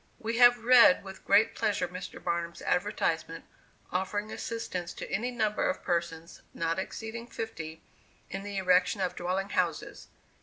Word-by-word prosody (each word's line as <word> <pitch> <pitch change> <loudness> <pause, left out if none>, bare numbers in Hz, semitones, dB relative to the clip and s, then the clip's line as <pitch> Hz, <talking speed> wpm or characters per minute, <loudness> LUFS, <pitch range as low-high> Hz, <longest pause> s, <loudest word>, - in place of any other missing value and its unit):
We 230 +1 -3
have 245 -1 +6
read 240 -6 +7
with 190 -1 -10
great 205 +3 +4
pleasure 215 -5 0
Mr. 180 +1 -8
Barnum's 170 -1 -3
advertisement, 165 -2 -1 0.5
offering 205 +3 -2
assistance 185 -6 -4
to - - -7
any 230 +5 -1
number 220 -2 0
of 280 - -3
persons, 170 -1 -3
not 165 +1 -1
exceeding 225 +4 -6
fifty, 160 -10 -6 0.4
in 195 - -5
the 200 0 -5
erection 185 +2 +3
of 185 -2 -1
dwelling 185 +3 -2
houses. 175 -5 -2
190 Hz, 145 wpm, -29 LUFS, 175-220 Hz, 0.5 s, read